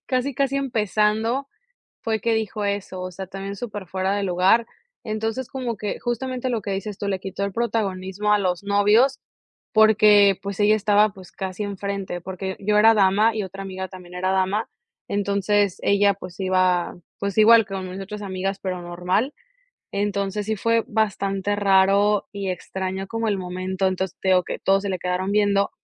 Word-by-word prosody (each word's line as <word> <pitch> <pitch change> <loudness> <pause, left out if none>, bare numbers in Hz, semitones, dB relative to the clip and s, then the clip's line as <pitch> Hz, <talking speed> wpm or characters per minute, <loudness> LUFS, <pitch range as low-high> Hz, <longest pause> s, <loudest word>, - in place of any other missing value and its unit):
casi, 255 0 -1
casi 275 +1 0
empezando 225 0 0 0.6
fue 220 -1 -1
que 230 +1 +1
dijo 215 -1 -2
eso, 200 -2 -3
o 185 0 -5
sea, 190 +1 -7
también 195 +1 -6
superfuera 195 -3 -3
de 200 - -1
lugar, 190 +5 +3 0.4
entonces 225 +3 -3
como 245 -5 -4
que 205 0 -4
justamente 255 +1 -3
lo 230 -3 -2
que 200 - -3
dices 195 +1 -4
tú, 200 - -4
le 190 -1 -1
quitó 195 +1 -5
el 200 - -5
protagonismo 210 -3 -1
a 210 - +3
los 180 -1 -1
novios 210 +6 +3 0.6
porque, 210 -2 +6
pues, 200 0 -5
ella 210 +1 +5
estaba, 210 0 +3
pues, 190 -3 -14
casi 190 +1 -5
enfrente, 200 -3 -4
porque 190 +1 -5
yo 210 +1 +1
era 225 +1 +7
dama 210 +2 +3
y 215 - -1
otra 195 +1 -7
amiga 190 -1 -5
también 180 -1 -12
era 185 +1 -1
dama, 190 +3 0 0.4
entonces 200 -1 +1
ella, 200 0 +3
pues, 185 -1 -11
iba, 185 -2 +1 0.2
pues 200 +1 -3
igual 225 0 +7
que 195 - -6
mis 185 0 -6
otras 210 +2 -7
amigas, 195 0 -3
pero 185 -2 -4
normal, 180 +10 -1 0.6
entonces 200 0 -1
sí 220 - 0
fue 230 +2 +1
bastante 205 -2 -1
raro 200 +1 +3
y 200 -2 -3
extraño 190 +1 -4
como 225 0 -2
el 200 - +1
momento, 185 +1 -2
entonces 185 0 -3
te 190 - -2
digo 185 -1 +4
que, - - -5
todos 195 +1 +2
se 200 - -1
le 185 - -2
quedaron 180 +2 -1
viendo 200 -1 +2
200 Hz, 175 wpm, -23 LUFS, 190-215 Hz, 0.6 s, era